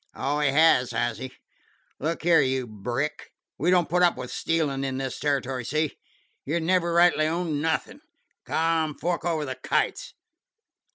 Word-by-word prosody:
"Oh, 145 +3 -1
he 145 -1 +2
has, 140 -3 +4
has 120 0 -1
he? 130 0 -6 0.7
Look 160 +4 -2
here, 170 -1 +5
you 130 -1 0
Brick, 120 +8 -4 0.3
we 170 - +1
don't 180 -2 +3
put 180 +1 +1
up 175 -1 +4
with - - -6
stealin' 150 -5 -1
in 135 -1 -2
this 130 -1 -4
territory. 135 -3 -1
See? 155 +5 -1 0.5
You 160 +5 -1
never 170 +1 +1
rightly 170 -2 +4
owned 160 -3 -1
nothin'. 160 +1 -2 0.4
Come, 160 -2 0
fork 170 0 -2
over 160 -3 0
the 130 -2 -6
kites. - - -1
155 Hz, 160 wpm, -26 LUFS, 135-165 Hz, 0.7 s, here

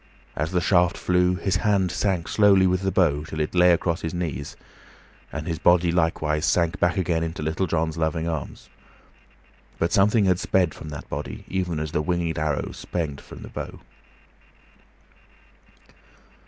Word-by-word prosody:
As 75 +2 -1
the 90 0 0
shaft 85 0 +3
flew, 90 0 +2
his 95 +1 0
hand 100 -4 +1
sank 90 -1 -1
slowly 100 -3 +5
with 90 0 +1
the 95 0 0
bow 75 -6 +2
till 80 0 -7
it 75 - -1
lay 90 0 +5
across 85 0 0
his 80 +1 -4
knees, 75 -6 -4 0.8
and 75 0 -5
his 80 -2 -3
body 85 -1 +4
likewise 80 -3 0
sank 85 +1 +1
back 90 +3 +2
again 85 -3 0
into 80 -1 -4
Little 80 +5 -1
John's 80 -1 -1
loving 80 +1 -1
arms; 80 -4 -5 1.1
but 85 - 0
something 105 +2 +4
had 90 -1 +2
sped 90 -4 +1
from 80 - -9
that 75 -2 -8
body, - - -6
even 90 -4 -2
as 75 -1 -4
the 75 - 0
winged 85 -1 -1
arrow 75 -2 -1
sped 80 -6 -4
from - - -11
the - - -9
bow. - - -7
85 Hz, 165 wpm, -24 LUFS, 80-90 Hz, 1.1 s, slowly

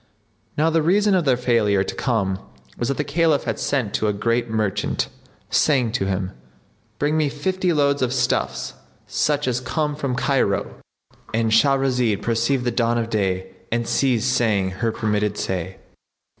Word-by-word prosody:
Now 160 +2 +3
the 165 0 +3
reason 200 +6 +3
of 180 -4 +2
their 130 -3 +3
failure 115 -6 +2
to - - -5
come 100 -7 -1 0.4
was 120 - -2
that 140 - -1
the 150 - 0
Caliph 155 0 +2
had - - -3
sent 130 -8 -1
to 110 - 0
a 105 - +1
great 115 +3 0
merchant, 105 -2 -1 0.4
saying 130 -7 +3
to 105 -5 -1
him, 95 -1 -2 0.7
"Bring 145 +4 0
me 155 -2 +2
fifty 185 +5 -1
loads 140 -3 +2
of 125 -1 +1
stuffs, 130 -1 -1 0.3
such 145 -2 0
as 125 -1 +1
come 150 +4 -1
from 140 -4 -2
Cairo,"—And 115 -2 -2
Shahrazad 125 -2 +2
perceived 120 +3 +1
the 120 - 0
dawn 120 0 +1
of 115 0 -2
day 95 -3 -1 0.2
and 120 0 0
ceased 125 -2 +1
saying 100 -6 +1
her 105 +5 -1
permitted 105 -1 -1
say. 95 0 -3
120 Hz, 160 wpm, -22 LUFS, 105-140 Hz, 0.7 s, Now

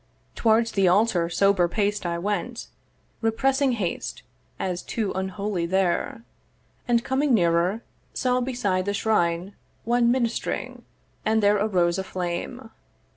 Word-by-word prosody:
Towards 225 0 +2
the 195 -2 +2
altar 180 -3 +3
sober 185 +1 +3
paced 205 0 -1
I 170 0 -1
went, 205 +6 -3 0.5
Repressing 265 +4 +2
haste, 200 -7 -3 0.3
as 180 -1 -2
too 215 -4 -2
unholy 190 -1 -2
there; 190 +4 0 0.6
And, 235 -1 +2
coming 265 0 +2
nearer, 175 +3 +2 0.3
saw 250 -1 0
beside 205 -8 -1
the 200 0 -1
shrine 180 -3 0 0.3
One 235 +1 +3
minist'ring; 240 -2 -2 0.4
and 220 0 +2
there 205 +1 +5
arose 185 -4 +1
a - - -2
flame. 185 +7 -5
205 Hz, 125 wpm, -25 LUFS, 180-230 Hz, 0.6 s, there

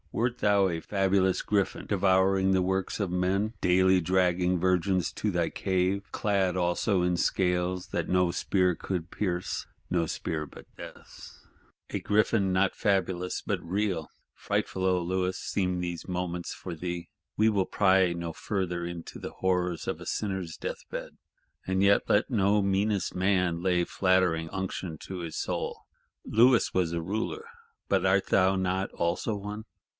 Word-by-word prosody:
Wert 120 +1 -1
thou 100 -2 +4
a 85 -2 -2
fabulous 95 -1 +1
Griffin, 100 -2 -1
devouring 95 -1 +3
the 95 -1 +3
works 95 +2 -1
of 100 -4 -1
men; 95 +4 0
daily 95 +1 +4
dragging 90 0 +2
virgins 90 -1 +1
to - - -1
thy - - 0
cave;—clad 95 0 0
also 90 +2 +1
in 90 0 +2
scales 90 0 0
that - - -2
no 90 -1 +3
spear 90 -1 +1
would 90 -3 -2
pierce: 90 -3 -2 0.2
no 85 -2 +1
spear 80 0 -3
but - - -13
Death's? - - -12 0.5
A - - -1
Griffin 105 -2 +2
not 95 +1 +2
fabulous 95 -2 0
but - - -2
real! 90 -2 -1 0.2
Frightful, 95 - -2
O 90 -1 +2
Louis, 90 +1 -1
seem 90 -2 -1
these 85 -2 -4
moments 90 -1 -3
for 90 -3 -7
thee.—We 90 +5 -3
will 100 -3 +1
pry 95 -2 +3
no 85 -1 -4
further 90 -3 -2
into 85 -1 -7
the - - -7
horrors 90 -2 -1
of - - -3
a - - -8
sinner's 95 -5 -3
death - - -5
bed. - - -5 0.5
And 95 0 0
yet 100 +1 +3
let 105 - +3
no 105 -3 +3
meanest 100 +1 0
man 90 -3 +1
lay 90 -1 +2
flattering 95 -4 +1
unction 95 -3 -4
to 95 -1 -6
his 85 -2 -5
soul. - - -3 0.4
Louis 120 +2 +4
was 90 -3 +1
a 85 0 -2
Ruler; 110 - -3 0.4
but - - +2
art 95 +1 +2
not 95 0 +2
thou - - -19
also 85 +6 0
one? 105 +2 -6
95 Hz, 150 wpm, -28 LUFS, 90-100 Hz, 0.5 s, thou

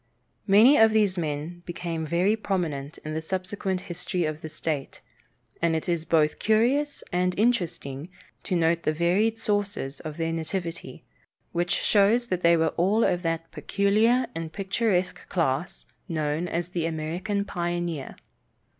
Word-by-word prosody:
Many 220 +8 +7
of 220 -1 +6
these 210 -4 +3
men 160 +1 -3
became 165 -2 -4
very 180 +6 +2
prominent 165 -9 -3
in 155 - -4
the 160 - -2
subsequent 185 +2 -3
history 180 0 -2
of 155 0 -3
the 155 - -6
state, 150 -3 -3 0.6
and 165 -1 +2
it 160 - -3
is 170 -2 0
both 155 -3 +2
curious 255 +7 +2
and 180 0 0
interesting 170 - 0 0.3
to 185 - -2
note 165 0 +2
the 155 - 0
varied 185 +8 +2
sources 205 -10 -1
of 155 0 -7
their 165 0 -1
nativity, 165 +1 -4 0.5
which 175 +1 0
shows 220 +4 +3
that 185 -1 -1
they 170 0 +5
were 160 -1 +1
all 200 +6 +3
of 180 - +1
that 165 -1 -2
peculiar 205 - +2
and 165 -1 -5
picturesque 195 -1 -1
class 165 -2 -1 0.2
known 155 +1 -1
as 170 0 -2
the 170 -2 -1
American 175 +6 -2
pioneer. 175 -5 -3
175 Hz, 145 wpm, -26 LUFS, 160-200 Hz, 0.6 s, Many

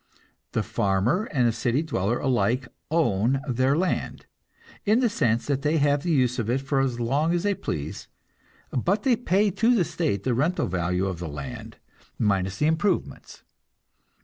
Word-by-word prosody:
The - - 0
farmer 100 - 0
and 125 - +1
the - - +3
city 125 +6 0
dweller 120 - -1
alike 125 -1 0 0.2
"own" 130 -5 +2
their 130 +3 +2
land, 180 +1 -2 0.6
in 215 +3 +3
the 245 -2 +3
sense 115 - 0
that 140 -2 -1
they 150 +2 +1
have 145 -1 +2
the 175 - -3
use 125 -4 +2
of 115 -1 -2
it 130 +3 +1
for 135 0 0
as 130 -3 0
long 145 +8 +1
as 175 - -1
they 205 0 +2
please, 75 - -5 0.6
but 190 - 0
they 260 -3 +4
pay 205 -2 +1
to 225 +6 +3
the 185 -7 +2
state 140 - -2
the 130 - +1
rental 150 +9 +1
value 90 +1 -1
of 95 -3 -3
the 85 -2 -5
land, 70 -1 -7 0.4
minus 95 -3 0
the 150 - +1
improvements. 160 +6 -1
135 Hz, 175 wpm, -25 LUFS, 115-170 Hz, 0.6 s, they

